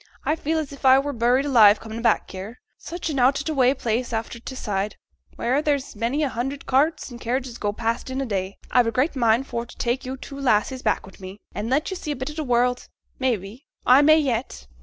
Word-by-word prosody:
I 305 - +2
feel 320 0 -1
as 310 -3 -3
if 280 - -12
I 260 0 +7
were 285 +1 -1
buried 245 +3 +2
alive 220 -7 +6
comin' 225 +1 -7
back 230 -2 +1
here, 195 +5 -8 0.2
such 335 -1 -5
an 275 - -1
out 260 +3 +4
o' - - -3
t' 320 - -1
way 265 -2 +3
place 240 0 -2
after 225 +1 -3
t' 260 +3 -8
Side, 205 -4 -2 0.4
wheere 255 +5 +1
there's 285 -5 -1
many 235 +8 -1
a 285 - +1
hundred 265 +4 -4
carts 275 +2 +1
and 240 0 -10
carriages 250 0 -3
goes 205 -1 -2
past 230 +2 -2
in 260 +1 -3
a 270 - -1
day. 195 -4 -3
I've 245 -2 +4
a - - +1
great 260 +7 0
mind 235 0 +2
for 235 -3 -3
t' 240 - -14
tak 240 +2 -1
yo' 260 +1 -4
two 275 +1 -9
lassies 255 0 +1
back - - 0
wi' 190 - -14
me, 190 +1 -9 0.2
and 210 +3 -4
let 295 +8 +1
yo' - - -3
see 310 - -7
a 295 - -1
bit 260 +3 -5
o' - - -9
t' 310 - -4
world; 245 -2 +1 0.3
may 260 -3 +2
be, 205 +9 -12 0.2
I 255 +3 +7
may 310 +2 +6
yet. 250 - -2
250 Hz, 245 wpm, -23 LUFS, 230-275 Hz, 0.4 s, I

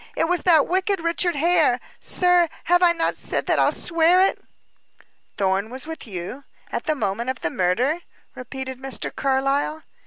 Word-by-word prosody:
It 325 - +2
was 360 +1 0
that 320 -6 +5
wicked 380 +2 0
Richard 340 +1 0
Hare. 310 -5 +3 0.2
Sir, 355 -2 +2
have 355 +1 +3
I 350 -1 +6
not 330 -1 -1
said - - -2
that - - +1
I'll - - +4
swear 335 +1 +3
it?" 385 - +2 0.9
"Thorn 195 +2 0
was 260 +4 -4
with 320 -4 -8
you 190 +8 -6 0.3
at - - -3
the 310 - 0
moment 230 0 -2
of 260 -2 -4
the 160 - -2
murder?" 240 - 0 0.3
repeated 260 0 -7
Mr. 265 0 -4
Carlyle. 275 +3 0
295 Hz, 165 wpm, -22 LUFS, 255-345 Hz, 0.9 s, I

